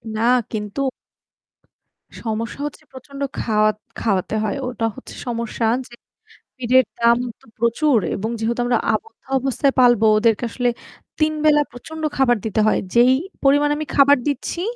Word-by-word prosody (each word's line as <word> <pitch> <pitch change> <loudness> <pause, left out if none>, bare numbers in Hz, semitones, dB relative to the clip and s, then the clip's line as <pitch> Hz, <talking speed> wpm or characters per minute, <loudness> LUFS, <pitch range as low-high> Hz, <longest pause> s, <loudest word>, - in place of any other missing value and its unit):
না 220 - -2 0.3
কিন্তু 210 +4 -4 1.4
সমস্যা 230 +3 -3
হচ্ছে 295 - -7
প্রচন্ড 275 +2 -11 0.2
খাওয়া 215 -1 +2 0.3
খাওয়াতে 200 -1 0
হয়। 215 +6 -2
ওটা 235 -2 -2
হচ্ছে 265 - -11
সমস্যা 230 -1 -2 0.2
যে 240 - -18 0.6
পিটের 255 0 +3 0.2
দাম 235 0 +5 0.2
তো - - -23
প্রচুর 235 +3 +2 0.2
এবং 215 +3 -3
যেহেতু 230 +2 -1
আমরা 245 -1 +2 0.2
আবদ্ধ 445 - -6 0.2
অবস্থায় 270 +1 0
পালবো 240 -3 +5
ওদেরকে 225 +1 +2
আসলে 245 0 0 0.5
৩ 310 0 +2
বেলা 295 -1 +5
প্রচন্ড 315 +6 -9
খাবার 250 -3 +3
দিতে 220 -1 0
হয়। 215 - +2
যেই 245 +2 +6 0.3
পরিমাণে 290 +2 +4
আমি 310 - -4
খাবার 280 0 +6
দিচ্ছি 315 +4 -3
245 Hz, 140 wpm, -21 LUFS, 225-275 Hz, 1.4 s, যেই